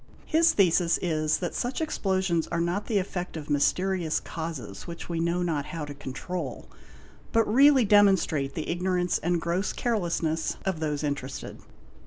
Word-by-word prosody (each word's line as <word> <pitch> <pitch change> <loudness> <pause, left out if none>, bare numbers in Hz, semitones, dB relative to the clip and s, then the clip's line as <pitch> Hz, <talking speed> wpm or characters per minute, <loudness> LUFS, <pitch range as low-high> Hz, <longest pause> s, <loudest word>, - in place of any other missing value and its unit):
His 330 +1 +4
thesis 175 -3 +3
is 155 -3 +1
that 175 - -3
such 245 +2 -2
explosions 190 - 0
are 170 - -2
not 175 +4 -1
the 220 - +1
effect 180 -3 -3
of 150 -2 -6
mysterious 175 +3 +1
causes 140 - -6
which 170 -1 -7
we 170 -1 -2
know 170 +2 0
not 155 -5 -1
how 165 -4 -5
to 145 - -7
control; 140 +2 -6 0.6
but 225 -1 +3
really 265 +2 +6
demonstrate 190 -9 +3
the 155 - -3
ignorance 180 0 0
and 175 +1 0
gross 170 +4 -1
carelessness 170 -8 -1
of 190 -4 -1
those 150 -2 -2
interested. 140 -2 -4
170 Hz, 155 wpm, -27 LUFS, 155-190 Hz, 0.6 s, really